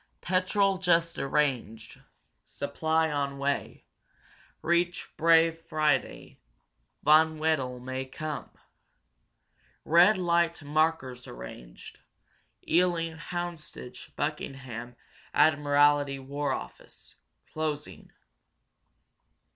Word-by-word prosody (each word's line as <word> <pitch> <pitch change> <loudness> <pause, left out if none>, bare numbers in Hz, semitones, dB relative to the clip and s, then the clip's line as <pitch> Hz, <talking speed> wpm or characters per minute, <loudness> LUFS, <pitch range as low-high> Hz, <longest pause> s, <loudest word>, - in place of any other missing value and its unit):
"Petrol 190 +1 +1
just 170 -2 +2
arranged. 130 -6 -1 0.4
Supply 160 +2 -1
on 140 -1 -2
way. 140 0 -2 0.8
Reach 170 +1 0
Bray 165 +1 +5
Friday. 155 -3 -2 0.6
Von 160 +1 +5
Wedel 145 -6 0
may 130 +1 -4
come. 155 +3 -6 1.4
Red 175 +6 +6
light 170 -2 +1
markers 145 -4 0
arranged. - - -11 0.7
Ealing 170 -2 +1
Houndsditch 165 -6 -7
Buckingham 130 -5 -5 0.4
Admiralty 145 -1 +4
War 140 +1 -3
Office. - - -8 0.4
Closing." 155 -1 -4
155 Hz, 75 wpm, -28 LUFS, 140-165 Hz, 1.4 s, Red